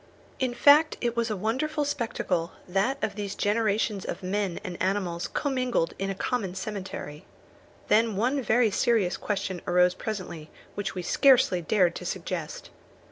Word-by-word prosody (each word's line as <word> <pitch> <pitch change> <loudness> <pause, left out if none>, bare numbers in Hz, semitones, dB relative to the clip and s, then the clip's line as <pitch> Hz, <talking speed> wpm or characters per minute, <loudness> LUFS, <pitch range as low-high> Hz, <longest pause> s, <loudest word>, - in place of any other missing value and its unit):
In 255 -3 -1
fact 295 +5 +6
it 235 -1 -1
was 235 -1 0
a 215 - -1
wonderful 265 +10 -1
spectacle, 185 -10 -2
that 195 +9 +1
of 210 - 0
these 205 -1 -5
generations 210 -1 0
of 190 - -5
men 190 -1 -1
and 180 -1 -6
animals 185 -2 -1
commingled 255 - -1
in 195 0 -1
a 195 - -2
common 195 -3 -2
cemetery. 190 -7 -6 0.6
Then 225 -1 +3
one 255 +7 +1
very 230 -1 +3
serious 200 -4 +2
question 190 -3 -3
arose 180 0 +4
presently 185 -8 -6 0.2
which 205 -2 -4
we 180 - -4
scarcely 255 -5 +4
dared 180 0 +2
to 180 - -8
suggest. 175 -4 -5
205 Hz, 150 wpm, -27 LUFS, 185-235 Hz, 0.6 s, fact